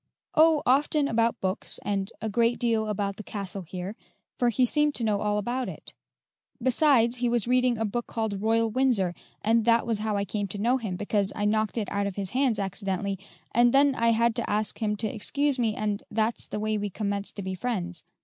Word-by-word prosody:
"Oh, 315 -1 +5
often 285 +3 +3
about 230 -2 +1
books, 190 +1 -1
and 195 -1 -1
a - - 0
great 230 +3 +2
deal 225 -2 0
about 200 -1 -2
the 215 - -7
castle 200 -2 -5
here, 185 +3 -6 0.4
for 245 - +3
he 250 +2 +2
seemed 295 +3 +2
to 235 - -2
know 210 -2 +1
all 210 0 0
about 240 +5 -2
it. - - -11 0.7
Besides, 255 -1 +3
he 245 0 0
was 235 -2 0
reading 250 -1 +2
a 225 - -1
book 240 +3 -3
called 220 -4 -3
'Royal 225 +1 +2
Windsor,' 225 -8 +2 0.3
and 225 +1 +3
that 230 0 +4
was 225 -3 -1
how 215 -1 -1
I 200 - -1
came 205 +1 -3
to 195 - -5
know 240 +6 +2
him, 215 -7 -4
because 205 +1 0
I 205 - -1
knocked 215 +1 0
it 215 -3 -1
out 200 0 0
of 195 - -5
his 195 -2 -3
hands 255 -3 +1
accidentally, 195 0 -3 0.3
and 240 +2 +4
then 280 0 +5
I 230 -2 +2
had 230 0 +2
to 235 - -2
ask 210 +1 +3
him 210 -2 0
to 215 +1 0
excuse 275 +6 0
me, 225 -3 +1
and 210 -1 -2
that's 220 +2 -1
the 210 - -4
way 215 0 -1
we 205 0 -2
commenced 200 0 -3
to 200 - -5
be 190 0 -3
friends. 185 -4 -3
220 Hz, 215 wpm, -27 LUFS, 200-240 Hz, 0.7 s, Oh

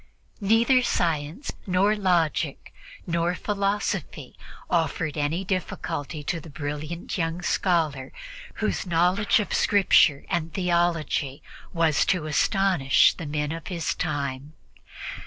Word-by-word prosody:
Neither 230 +5 +4
science 165 - -1 0.2
nor 195 +3 +3
logic 170 -7 0 0.3
nor 170 +1 0
philosophy 200 +1 -2 0.3
offered 165 -2 0
any 155 +5 -1
difficulty 165 -5 -3
to 170 +3 -2
the 160 - -12
brilliant 150 +5 -5
young 165 +1 -2
scholar, 155 -8 0 0.4
whose 215 -3 -2
knowledge 180 +7 +3
of 210 - -3
Scripture 185 -7 +4
and 160 -2 -1
of 165 - -20
theology 170 -6 0 0.3
was 165 -3 +2
to 180 -5 +1
astonish 170 -2 +3
the 165 - -7
men 150 0 -2
of 165 -1 -6
his 170 -3 -2
time. 140 0 -3
170 Hz, 115 wpm, -25 LUFS, 150-185 Hz, 0.4 s, Neither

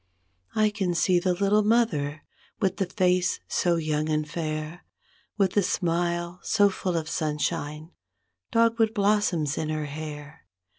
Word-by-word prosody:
I 215 -1 +3
can 190 -4 -1
see 180 +1 +3
the 180 0 0
little 200 +3 +3
mother, 205 -10 +1 0.4
with 190 -3 0
the 195 -3 0
face 180 -1 +1
so 175 -1 +1
young 155 -1 -1
and 155 0 0
fair. 155 +1 -4 0.5
With 195 -3 +3
the 205 - +4
smile 175 -1 -1
so 205 -2 +3
full 180 -2 -2
of 160 -1 -3
sunshine, 150 +1 -2 0.6
dogwood 230 0 +2
blossoms 200 -8 +1
in 155 - -2
her 155 -1 -2
hair. 150 +1 -8
175 Hz, 140 wpm, -26 LUFS, 155-200 Hz, 0.6 s, the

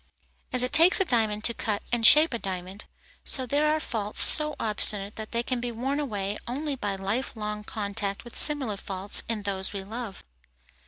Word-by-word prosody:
As 250 0 +5
it 250 - -4
takes 340 +5 +6
a 385 - 0
diamond 220 -6 0
to 235 - 0
cut 210 -3 -5
and 235 -2 +3
shape 305 0 +4
a 235 - -4
diamond, 190 +1 -7 0.4
so 260 - -1
there 290 +4 -1
are 310 - -1
faults 215 -7 -5
so 300 -1 +5
obstinate 210 -1 +5
that 220 -1 -9
they 235 0 -2
can 250 -1 -4
be 245 0 -5
worn 265 +5 -4
away 205 -7 -5
only 280 +4 -5
by 205 -6 -5
life 200 +8 -5
long 210 -1 -6
contact 200 -1 -5
with 240 - -14
similar 270 -9 +3
faults 195 +1 -4
in 220 -3 -3
those 195 -1 -2
we 195 -1 -7
love. 220 0 -9
220 Hz, 195 wpm, -25 LUFS, 205-255 Hz, 0.4 s, takes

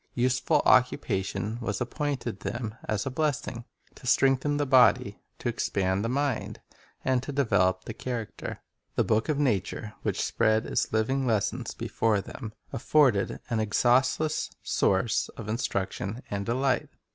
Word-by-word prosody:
Useful 130 +4 +2
occupation 105 -3 +2
was 105 -4 -2
appointed 125 -4 -3
them 115 +1 -4
as 105 -1 -1
a 135 - -2
blessing, 130 -5 -2 0.3
to - - -11
strengthen 135 +3 +3
the 145 - +1
body, 130 -2 +4 0.2
to - - -4
expand 95 0 0
the 115 - -1
mind, 140 -2 -1 0.5
and 130 -1 +2
to 135 - -5
develop 95 -9 +2
the 115 - -5
character. 120 -2 -5 0.3
The - - +3
book 110 +5 +1
of 150 - +1
nature, 105 -5 -1
which - - -2
spread 110 +1 +2
its - - -1
living 130 +5 +1
lessons 110 +2 -1
before 115 -2 0
them, 105 +2 -8 0.2
afforded 125 -5 +2
an 115 - +1
exhaustless 130 +7 +2
source 95 +3 +1
of 110 - -6
instruc 105 -3 -1
tion 110 +6 -5
and 100 -1 -3
delight. 130 +3 +1
120 Hz, 145 wpm, -28 LUFS, 105-130 Hz, 0.5 s, body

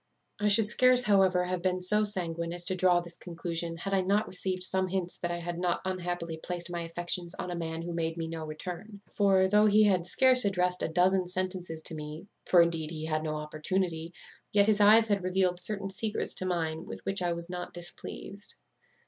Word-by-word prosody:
"I 210 - +1
should 210 +1 +4
scarce, 250 +3 +4
however, 190 -4 +3
have 180 0 -3
been 185 0 0
so 210 +4 +4
sanguine 170 -4 +1
as 175 0 -1
to 185 - +2
draw 180 -1 +3
this 170 0 -10
conclusion, 170 -1 -4
had 195 +3 -4
I 195 - +3
not 200 +3 +1
received 185 0 -2
some 190 0 0
hints 185 -1 -3
that 175 - -2
I 175 - -2
had 170 0 -5
not 175 -1 0
unhappily 175 -3 -3
placed 175 -1 -5
my 175 -1 -3
affections 175 +1 -3
on 180 - -5
a - - -3
man 165 -1 -4
who 175 0 -5
made 165 0 -2
me 165 -1 -3
no 160 -1 -5
return; 180 +7 -7
for, 195 -2 +4
though 210 +2 +4
he 215 +1 +5
had 185 -4 +2
scarce 255 +5 +4
addressed 180 -2 0
a - - 0
dozen 180 +3 +2
sentences 180 -3 -4
to - - 0
me 155 +3 -7 0.2
(for, 175 -2 +6
indeed, 165 -2 -2
he 155 -1 -5
had 155 -1 -1
no 155 -1 -3
opportunity), 160 +2 -2 0.4
yet 200 -1 +4
his 210 -1 +2
eyes 220 +2 +7
had 205 -3 0
revealed 185 -1 +1
certain 195 +1 -3
secrets 210 +2 -2
to 185 - -2
mine 165 -2 -2
with - - -9
which 195 -1 -1
I 175 -1 0
was 170 0 -6
not 180 0 -6
displeased. 185 +3 -6
180 Hz, 210 wpm, -29 LUFS, 170-195 Hz, 0.4 s, eyes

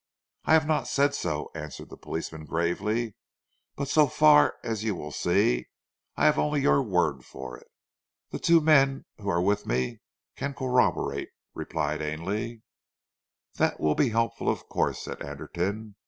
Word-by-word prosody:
"I - - +4
have 160 -1 +5
not 155 0 0
said 140 +1 +2
so," 75 -1 -3
answered 75 -2 -8
the - - -8
policeman 80 -1 -6
gravely, 100 +8 -1 0.6
"but 140 - -3
so 150 +1 +4
far, 150 +2 +5
as 110 -2 -3
you 110 -3 0
will 75 -3 -7
see, - - +1 0.5
I - - +1
have 150 - +4
only 150 -1 +1
your 140 0 +4
word 90 - 0
for 65 -1 -8
it." - - -16 0.6
"The - - -4
two 170 -1 +5
men 135 -3 +4
who 100 -1 -4
are 85 -1 +1
with 100 +2 0
me 60 +1 -1 0.4
can 140 0 -4
corroborate," 125 -2 +1 0.2
replied 75 +1 -2
Ainley. 105 +10 -4 0.9
"That - - +1
will 75 -1 +2
be 135 - +2
helpful, 115 0 0
of - - -2
course," - - -1
said - - -7
Anderton. 90 +9 -4
105 Hz, 155 wpm, -27 LUFS, -, 0.9 s, have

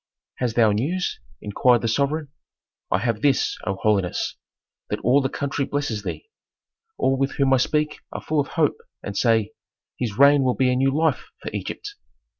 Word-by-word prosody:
"Hast 120 -3 -1
thou 110 -3 +5
news?" 150 - -1 0.2
inquired 120 +4 +2
the - - +1
sovereign. 145 +5 0 0.6
"I - - +2
have 110 +1 -1
this, 140 -1 +2
O 95 - 0
holiness, 100 -3 0 0.5
that - - -2
all 130 +4 +4
the 135 - -1
country 140 +1 -2
blesses 145 -6 -2
thee. 260 - -6 0.7
All 135 - +2
with 135 0 0
whom 135 -1 +2
I - - +5
speak 150 +4 0
are - - -5
full 155 -1 -1
of 140 - 0
hope, - - +1 0.3
and 100 - -5
say, 110 -2 +2 0.5
'His 110 -5 -3
reign 140 +1 +6
will 130 -2 +1
be 130 -1 +2
a - - +1
new 135 +2 +3
life 155 0 0 0.2
for - - -5
Egypt.'" 415 -1 -5
130 Hz, 180 wpm, -23 LUFS, 110-145 Hz, 0.7 s, reign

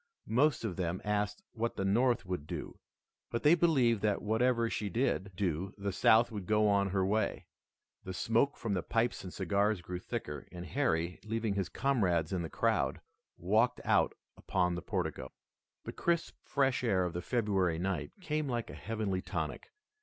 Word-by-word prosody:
Most 135 +2 +2
of 95 -6 -3
them 90 0 -1
asked 105 0 -1
what 115 0 -2
the 95 - -2
North 120 +4 +2
would 90 -5 -4
do, - - -6 0.5
but 115 - -3
they 150 +2 +7
believed 135 - +3
that 105 -2 +1
whatever 115 +2 +2
she 105 -2 -2
did 100 -3 0
do 90 0 -2
the 100 0 -2
South 110 +5 +4
would 100 -5 -6
go 105 0 +3
on 100 -1 +3
her 95 0 +1
way. 110 +3 0 0.6
The 95 0 -6
smoke 115 +8 +2
from 110 -3 -2
the 90 - 0
pipes 115 +5 0
and 90 - -7
cigars 100 +3 +1
grew 90 0 -5
thicker, 80 - -5
and 90 -1 -7
Harry, 90 - 0
leaving 110 -1 -1
his 100 -2 -1
comrades 95 - +1
in 90 - 0
the 80 - -4
crowd, - - +1 0.4
walked - - +2
out - - +3 0.2
upon 90 -2 0
the 85 - -3
portico. 80 - -3 0.5
The - - -6
crisp, 170 -1 0
fresh 135 -3 +1
air 95 -6 +2
of 90 - -3
the 90 - -3
February 95 -6 +1
night 85 -4 -2
came 155 -4 -1
like 120 -2 -2
a - - -9
heavenly 105 -4 -2
tonic. 90 -5 -4
100 Hz, 175 wpm, -32 LUFS, 90-115 Hz, 0.6 s, they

